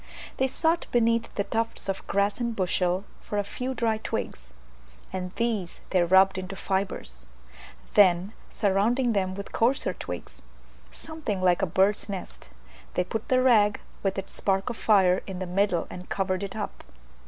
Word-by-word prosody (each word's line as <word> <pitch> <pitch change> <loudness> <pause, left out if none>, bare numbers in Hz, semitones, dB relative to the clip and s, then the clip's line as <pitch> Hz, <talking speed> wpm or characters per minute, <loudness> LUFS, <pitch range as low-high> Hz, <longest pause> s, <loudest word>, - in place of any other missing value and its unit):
They 265 - +2
sought 325 +5 +1
beneath 230 -1 +2
the 200 - +1
tufts 225 +1 -2
of 195 0 -3
grass 200 +2 +1
and 235 -2 -1
bushel 180 -1 +1 0.2
for 210 - -5
a 205 - +2
few 255 +6 -4
dry 225 -3 +1
twigs, 60 - -5 0.6
and 180 -1 -3
these 220 -7 -2
they 185 - +4
rubbed 190 +2 +5
into 185 +1 -6
fibres; 190 - -3 0.7
then 190 0 +5 0.2
surrounding 225 +5 +2
them 190 -2 0
with 200 0 -7
coarser 235 -5 +1
twigs, 90 - -8 0.5
something 300 - -5
like 180 0 +3
a 190 - +2
bird's 195 +5 +2
nest, 190 - -7 0.5
they 180 - +2
put 220 +4 -4
the 255 0 +3
rag 210 -5 +4 0.2
with 195 -1 -1
its 195 - -5
spark 195 +4 0
of - - -6
fire 190 -4 +4
in 190 -2 -5
the 185 - -3
middle 180 -1 +1
and 180 0 -9
covered 185 -1 -1
it 200 0 -5
up. 210 -2 -5
200 Hz, 165 wpm, -27 LUFS, 185-225 Hz, 0.7 s, rubbed